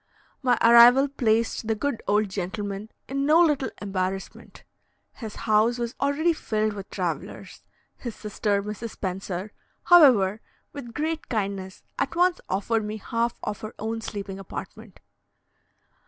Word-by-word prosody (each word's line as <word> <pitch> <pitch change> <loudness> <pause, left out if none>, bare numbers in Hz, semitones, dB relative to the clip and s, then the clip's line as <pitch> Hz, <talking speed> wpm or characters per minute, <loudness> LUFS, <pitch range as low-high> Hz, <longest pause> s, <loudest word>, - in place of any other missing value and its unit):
My 250 -3 +3
arrival 240 +4 +8
placed 230 -4 0
the 220 - +1
good 260 +1 -2
old 210 +1 +2
gentleman 200 +2 -4 0.2
in 275 +1 -2
no 305 +4 +5
little 300 -6 +3
embarrassment: 195 -1 -4 0.5
his 220 -3 -8
house 220 +2 +2
was 235 0 -3
also 280 +1 +1
already 330 +3 +2
filled 215 -7 -1
with 200 -1 -8
travellers. - - -5 0.4
His 235 -3 -6
sister, 205 -1 -1
Mrs. 210 +2 -5
Spencer, 190 0 -5 0.3
however, 235 - +6 0.3
with 240 -5 -9
great 315 +1 -3
kindness, 195 -4 -3 0.2
at - - -1
once 355 +1 +2
offered 220 +4 0
me 210 +1 -4
half 230 +3 -2
of 210 -1 -4
her 215 - -7
own 225 +1 -3
sleeping 200 -3 -6
apartment. 195 +2 -9
220 Hz, 140 wpm, -25 LUFS, 200-250 Hz, 0.5 s, arrival